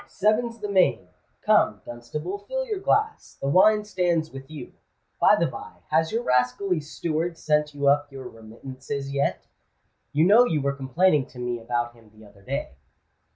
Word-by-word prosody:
"Seven's 225 Hz, +3 st, 0 dB
the 210 Hz, -2 st, -5 dB
main. 135 Hz, -, +2 dB, 0.3 s
Come, -, -, +3 dB
Dunstable, 150 Hz, +11 st, -6 dB
fill -, -, -4 dB
your 430 Hz, -5 st, -3 dB
glass: 430 Hz, +3 st, -1 dB
the 135 Hz, -, -3 dB
wine 210 Hz, +8 st, +5 dB
stands 175 Hz, -5 st, 0 dB
with 135 Hz, +1 st, -10 dB
you. 150 Hz, -5 st, -9 dB, 0.5 s
By -, -, +6 dB
the -, -, +1 dB
by, -, -, -7 dB, 0.2 s
has 160 Hz, +1 st, +2 dB
your 230 Hz, +2 st, -1 dB
rascally 125 Hz, -, +1 dB
steward 160 Hz, +2 st, -3 dB
sent 150 Hz, -1 st, 0 dB
you 140 Hz, 0 st, -1 dB
up 145 Hz, +1 st, +3 dB
your 135 Hz, -2 st, -8 dB
remittances 130 Hz, +5 st, -8 dB
yet? 140 Hz, 0 st, -1 dB, 0.7 s
You 150 Hz, +3 st, +3 dB
know 215 Hz, +6 st, +7 dB
you 160 Hz, -11 st, 0 dB
were 140 Hz, 0 st, -1 dB
complaining 140 Hz, +2 st, +1 dB
to 125 Hz, -, -17 dB
me 120 Hz, -1 st, -3 dB
about 120 Hz, +1 st, -2 dB
him 115 Hz, -2 st, -20 dB
the 110 Hz, 0 st, -17 dB
other 100 Hz, -1 st, -19 dB
day." 135 Hz, -, -4 dB
145 Hz, 170 wpm, -25 LUFS, 125-185 Hz, 0.7 s, know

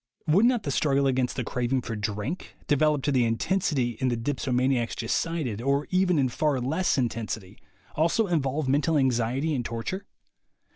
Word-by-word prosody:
Would 185 Hz, +9 st, +4 dB
not 245 Hz, -4 st, +1 dB
the 140 Hz, -, -2 dB
struggle 140 Hz, 0 st, +2 dB
against 130 Hz, -2 st, +1 dB
the 130 Hz, -, -2 dB
craving 125 Hz, +2 st, -1 dB
for 115 Hz, -, -4 dB
drink, 105 Hz, -, -4 dB
developed 150 Hz, -1 st, +2 dB
to 145 Hz, -, +2 dB
the 130 Hz, -3 st, +3 dB
intensity 120 Hz, -, 0 dB
in 130 Hz, -, +2 dB
the 120 Hz, -2 st, 0 dB
dipsomaniacs 125 Hz, -1 st, 0 dB
just 115 Hz, 0 st, -1 dB
cited, 155 Hz, -10 st, -2 dB
or 140 Hz, +3 st, 0 dB
even 185 Hz, -2 st, +3 dB
in 135 Hz, -2 st, +3 dB
far 140 Hz, +2 st, 0 dB
less 155 Hz, +9 st, 0 dB
intensity, 110 Hz, -5 st, -3 dB, 0.3 s
also 170 Hz, +8 st, +2 dB
involve 150 Hz, -5 st, 0 dB
mental 150 Hz, +4 st, +2 dB
anxiety 130 Hz, +3 st, +1 dB
and 125 Hz, -4 st, -1 dB
torture? 115 Hz, -, -4 dB
135 Hz, 165 wpm, -26 LUFS, 120-155 Hz, 0.3 s, Would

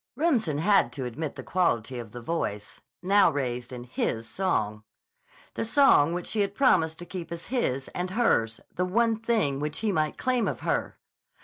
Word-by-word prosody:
(Remsen 240 Hz, -, +1 dB
had 195 Hz, -, +3 dB
to 130 Hz, 0 st, -4 dB
admit 140 Hz, +5 st, -4 dB
the -, -, -7 dB
quality 130 Hz, -9 st, 0 dB
of 115 Hz, -3 st, -8 dB
the 120 Hz, -, -8 dB
voice, 115 Hz, -7 st, -4 dB, 0.2 s
now 200 Hz, +2 st, +5 dB
raised 125 Hz, -3 st, -3 dB
in 125 Hz, -1 st, -7 dB
his 115 Hz, -2 st, -2 dB
song. 110 Hz, -, -1 dB, 0.7 s
The -, -, -2 dB
song 225 Hz, -, +5 dB
which 175 Hz, -, -4 dB
she 215 Hz, -, 0 dB
had 200 Hz, 0 st, -1 dB
promised 165 Hz, -, +3 dB
to 175 Hz, -, -8 dB
keep 175 Hz, -2 st, -7 dB
as 170 Hz, 0 st, -6 dB
his 135 Hz, -, 0 dB
and 180 Hz, +1 st, -4 dB
hers; 150 Hz, -, +1 dB
the 180 Hz, -, -1 dB
one 225 Hz, +4 st, +2 dB
thing 220 Hz, -11 st, 0 dB
which 150 Hz, +1 st, -3 dB
he 220 Hz, -2 st, +1 dB
might 155 Hz, -4 st, 0 dB
claim 255 Hz, -2 st, +1 dB
of -, -, -3 dB
her!) -, -, -1 dB
165 Hz, 185 wpm, -27 LUFS, 125-205 Hz, 0.7 s, now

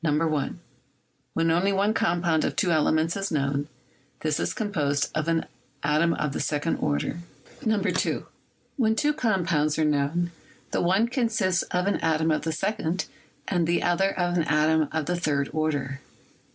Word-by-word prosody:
When 165 Hz, 0 st, +2 dB
only 180 Hz, +4 st, +2 dB
one 200 Hz, +2 st, +2 dB
compound 170 Hz, -4 st, +1 dB
of -, -, -1 dB
two 180 Hz, -, +1 dB
elements 160 Hz, +1 st, +2 dB
is 195 Hz, 0 st, -2 dB
known, 140 Hz, -1 st, 0 dB, 0.5 s
this 155 Hz, -1 st, 0 dB
is -, -, 0 dB
composed 150 Hz, -9 st, 0 dB
of 155 Hz, +1 st, -1 dB
an 165 Hz, -1 st, +1 dB, 0.4 s
atom 155 Hz, +3 st, +2 dB
of 150 Hz, -2 st, -2 dB
the -, -, -3 dB
second 150 Hz, +2 st, -1 dB
order. 75 Hz, -, -1 dB, 0.4 s
2. 205 Hz, -5 st, 0 dB, 0.5 s
When 220 Hz, -4 st, +2 dB
two 295 Hz, +5 st, +2 dB
compounds 175 Hz, -, +1 dB
are 160 Hz, -, +2 dB
known, 150 Hz, +4 st, +1 dB, 0.4 s
the -, -, 0 dB
one 190 Hz, +6 st, +3 dB
consists 225 Hz, -8 st, +1 dB
of 180 Hz, 0 st, 0 dB
an 200 Hz, -, +1 dB
atom 160 Hz, 0 st, +1 dB
of 155 Hz, -, +1 dB
the 160 Hz, -, -2 dB
second 180 Hz, +1 st, -1 dB, 0.4 s
and 175 Hz, -4 st, +1 dB
the 170 Hz, +1 st, +1 dB
other 195 Hz, +3 st, +1 dB
of 175 Hz, 0 st, +1 dB
an 170 Hz, -, +2 dB
atom 155 Hz, 0 st, +2 dB
of 160 Hz, -2 st, -1 dB
the 175 Hz, -, 0 dB
third 145 Hz, -5 st, 0 dB
order. 145 Hz, -3 st, -1 dB
165 Hz, 160 wpm, -26 LUFS, 150-190 Hz, 0.5 s, one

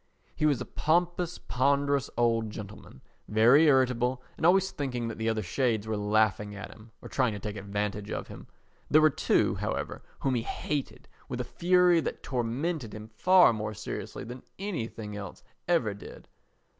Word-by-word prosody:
He 155 Hz, -, +2 dB
was 145 Hz, -4 st, +2 dB
a -, -, -4 dB
pompous, 175 Hz, +2 st, 0 dB
ponderous 140 Hz, +1 st, +1 dB
old 115 Hz, -2 st, +2 dB
gentleman, 105 Hz, -10 st, -10 dB, 0.2 s
very 120 Hz, +9 st, +6 dB
irritable 125 Hz, -2 st, +2 dB
and 160 Hz, -, +2 dB
always 190 Hz, +1 st, +4 dB
thinking 125 Hz, -7 st, -3 dB
that 115 Hz, -, -7 dB
the 110 Hz, 0 st, 0 dB
other 110 Hz, -1 st, -1 dB
shades 110 Hz, +2 st, 0 dB
were 110 Hz, -, -1 dB
laughing 105 Hz, 0 st, +1 dB
at 100 Hz, -, -8 dB
him 110 Hz, +1 st, -15 dB
or -, -, -7 dB
trying 125 Hz, -5 st, +1 dB
to 105 Hz, -, -5 dB
take 105 Hz, +1 st, -5 dB
advantage 105 Hz, +1 st, -3 dB
of -, -, -4 dB
him. -, -, -11 dB, 0.4 s
There 155 Hz, -, +6 dB
were 155 Hz, 0 st, +5 dB
two, -, -, +2 dB
however, -, -, -3 dB, 0.2 s
whom 135 Hz, -, +1 dB
he 120 Hz, -, +1 dB
hated 145 Hz, +4 st, -4 dB, 0.2 s
with -, -, -4 dB
a -, -, 0 dB
fury 180 Hz, -1 st, +3 dB
that -, -, -5 dB
tormented 125 Hz, +1 st, -2 dB
him 110 Hz, +1 st, -9 dB
far 180 Hz, +7 st, +5 dB
more 110 Hz, -1 st, -4 dB
seriously 105 Hz, -, -6 dB
than 125 Hz, +2 st, -8 dB, 0.2 s
anything 115 Hz, -, -5 dB
else 100 Hz, -3 st, -8 dB, 0.2 s
ever 165 Hz, -12 st, +2 dB
did. 100 Hz, -, -12 dB
120 Hz, 170 wpm, -29 LUFS, 110-150 Hz, 0.4 s, very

